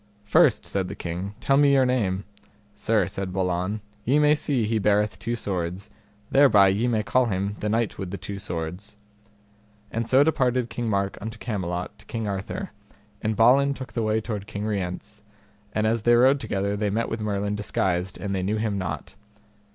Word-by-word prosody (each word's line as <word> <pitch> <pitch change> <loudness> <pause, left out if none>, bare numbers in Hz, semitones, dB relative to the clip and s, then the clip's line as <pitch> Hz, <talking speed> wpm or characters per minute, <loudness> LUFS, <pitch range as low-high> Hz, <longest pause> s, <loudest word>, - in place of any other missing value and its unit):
First, 105 - +4
said 95 -2 -2
the - - -6
king, 90 +4 -5
tell 135 - +2
me 140 -1 +5
your 135 -1 +5
name. 100 -7 0 0.5
Sir, 105 -1 +1
said 95 +1 -4
Balan, 90 +2 -1 0.2
ye 135 +6 +3
may 150 0 +5
see 140 -6 0
he 110 +1 0
beareth 105 +1 +1
two 115 +1 -2
swords, 95 -1 -4 0.4
thereby 110 -9 +6
ye 105 +6 +1
may 110 -3 +1
call 130 +3 +2
him 100 0 -1
the 105 - -2
Knight 115 0 0
with 95 - -4
the 100 - -5
Two 100 +2 -6
Swords. 90 +3 -5 0.9
And 115 0 -2
so 135 +2 +6
departed 130 -5 +1
King 120 -2 -2
Mark 100 -1 -1
unto 110 +2 -6
Camelot 90 -6 -4
to - - -17
King 115 -2 -3
Arthur, 95 -1 -4 0.5
and 110 0 -1
Balin 140 +5 +5
took 130 -1 -8
the 115 - -1
way 110 0 +1
toward 105 -3 -5
King 105 +1 -4
Rience; 105 +1 -4 0.5
and 110 +1 0
as 115 +1 +1
they 120 +2 +5
rode 130 +4 +5
together 100 -5 -1
they 105 0 0
met 110 +3 0
with 115 - -4
Merlin 105 -1 -1
disguised, 95 -3 -1
but 100 +2 -3
they 95 - -1
knew 100 +4 0
him 105 -2 -1
not. 80 -4 -5
105 Hz, 190 wpm, -25 LUFS, 95-115 Hz, 0.9 s, thereby